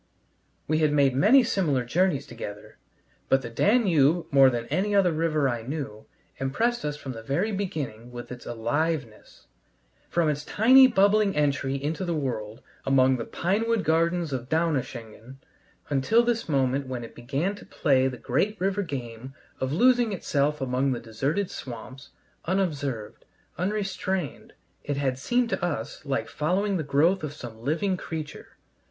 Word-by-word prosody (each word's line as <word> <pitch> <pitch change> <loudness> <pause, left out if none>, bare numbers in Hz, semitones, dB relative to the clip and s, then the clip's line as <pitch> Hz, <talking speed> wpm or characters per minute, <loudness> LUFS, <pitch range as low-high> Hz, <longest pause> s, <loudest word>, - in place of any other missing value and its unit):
We 155 +1 +1
had 155 -2 +3
made 140 -3 +3
many 230 - +6
similar 150 - 0
journeys 175 +3 +1
together, 105 0 -9 0.5
but 135 0 +3
the 120 - -6
Danube, 175 - +3
more 135 -1 +7
than 120 -2 -3
any 205 +2 0
other 190 -3 +4
river 155 -3 +1
I 120 -3 -2
knew, 125 -4 -6 0.3
impressed 225 - 0
us 150 0 -3
from 135 - -7
the 115 -2 -7
very 160 - -1
beginning 145 - -4
with 120 0 -8
its 125 0 -9
aliveness. 120 +1 -3 0.6
From 170 -2 +1
its 150 -1 -1
tiny 260 - +6
bubbling 205 -2 +3
entry 140 -2 +1
into 150 +6 -3
the 170 -2 -1
world 115 -5 -4 0.2
among 130 -1 +3
the 115 - -4
pinewood 215 +4 0
gardens 165 -1 +1
of 125 -1 -4
Donaueschingen, 130 -7 -2 0.5
until 145 - +3
this 235 -5 -1
moment 135 -1 +1
when 125 -2 -4
it 115 - -10
began 140 +10 -2
to 205 - -12
play 135 -3 +2
the 130 -1 -4
great 190 - -1
river 195 +2 0
game 130 - -6 0.2
of 130 0 -2
losing 240 - +3
itself 150 -5 0
among 130 +1 0
the 120 - -4
deserted 140 - -2
swamps, 130 +3 -9 0.4
unobserved, 145 - -2 0.3
unrestrained, 190 - -3 0.3
it 145 -1 -3
had 135 -2 -1
seemed 240 - +1
to - - -2
us 145 -11 -3
like 135 - -1
following 190 +6 0
the - - -1
growth 155 +7 +2
of 150 -1 -4
some 115 -6 -10
living 170 - 0
creature. 155 -4 -7
145 Hz, 155 wpm, -26 LUFS, 130-185 Hz, 0.6 s, more